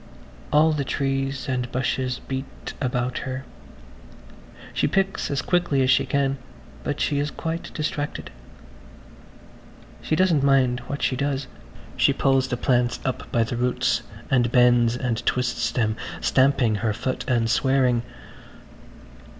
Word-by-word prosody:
All 155 Hz, +2 st, +5 dB
the 145 Hz, -2 st, -1 dB
trees 135 Hz, 0 st, -2 dB
and 125 Hz, -2 st, -2 dB
bushes 130 Hz, 0 st, -1 dB
beat 135 Hz, 0 st, -6 dB
about 125 Hz, -1 st, -1 dB
her. 130 Hz, 0 st, -5 dB, 1.3 s
She -, -, +1 dB
picks 195 Hz, 0 st, 0 dB
as 140 Hz, 0 st, -1 dB
quickly 175 Hz, -7 st, +2 dB
as 130 Hz, -, +3 dB
she 135 Hz, -, +3 dB
can, 135 Hz, -1 st, 0 dB, 0.4 s
but 145 Hz, -, -3 dB
she 145 Hz, -2 st, +1 dB
is 145 Hz, +1 st, 0 dB
quite 165 Hz, +2 st, -5 dB
distracted. 155 Hz, -1 st, -3 dB, 1.7 s
She 155 Hz, -, 0 dB
doesn't 175 Hz, -4 st, +3 dB
mind 135 Hz, -3 st, +3 dB
what 140 Hz, -, -4 dB
she 130 Hz, -, +1 dB
does–she 140 Hz, 0 st, -2 dB
pulls 135 Hz, -1 st, +2 dB
the 125 Hz, -, -2 dB
plants 120 Hz, -1 st, +1 dB
up 130 Hz, -, -3 dB
by 115 Hz, -, +3 dB
the 115 Hz, -, -3 dB
roots 125 Hz, +1 st, +1 dB, 0.3 s
and 120 Hz, -3 st, +3 dB
bends 120 Hz, -1 st, +4 dB
and 120 Hz, -2 st, -2 dB
twists 125 Hz, -2 st, 0 dB
them, 110 Hz, -4 st, 0 dB, 0.2 s
stamping 130 Hz, -5 st, +3 dB
her 110 Hz, 0 st, 0 dB
foot 130 Hz, +5 st, -3 dB
and 120 Hz, -3 st, +2 dB
swearing. 125 Hz, 0 st, +2 dB
130 Hz, 135 wpm, -24 LUFS, 125-140 Hz, 1.7 s, All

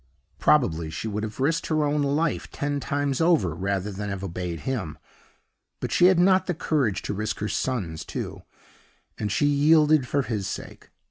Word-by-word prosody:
Probably 80 Hz, 0 st, +2 dB
she 80 Hz, +8 st, -5 dB
would 105 Hz, 0 st, -2 dB
have 110 Hz, +1 st, -6 dB
risked 160 Hz, +5 st, +1 dB
her 155 Hz, -1 st, +1 dB
own 145 Hz, 0 st, +1 dB
life 145 Hz, +3 st, 0 dB
ten 145 Hz, 0 st, -2 dB
times 140 Hz, +2 st, -1 dB
over 160 Hz, -, +3 dB
rather 95 Hz, +3 st, -2 dB
than 100 Hz, +1 st, -5 dB
have 100 Hz, -1 st, -4 dB
obeyed 90 Hz, -2 st, -4 dB
him; 110 Hz, -13 st, -3 dB, 0.8 s
but -, -, -4 dB
she 175 Hz, -, +4 dB
had 185 Hz, -1 st, +5 dB
not 185 Hz, +1 st, +4 dB
the 180 Hz, -, -1 dB
courage 140 Hz, -, 0 dB
to -, -, -3 dB
risk 105 Hz, +1 st, -3 dB
her 105 Hz, -, -3 dB
son's 90 Hz, -12 st, -2 dB
too; -, -, -6 dB, 0.8 s
and 105 Hz, -1 st, -2 dB
she 145 Hz, -, +2 dB
yielded 150 Hz, -1 st, +4 dB
for 140 Hz, +1 st, +1 dB
his 105 Hz, -6 st, -3 dB
sake. -, -, -7 dB
130 Hz, 180 wpm, -25 LUFS, 100-150 Hz, 0.8 s, had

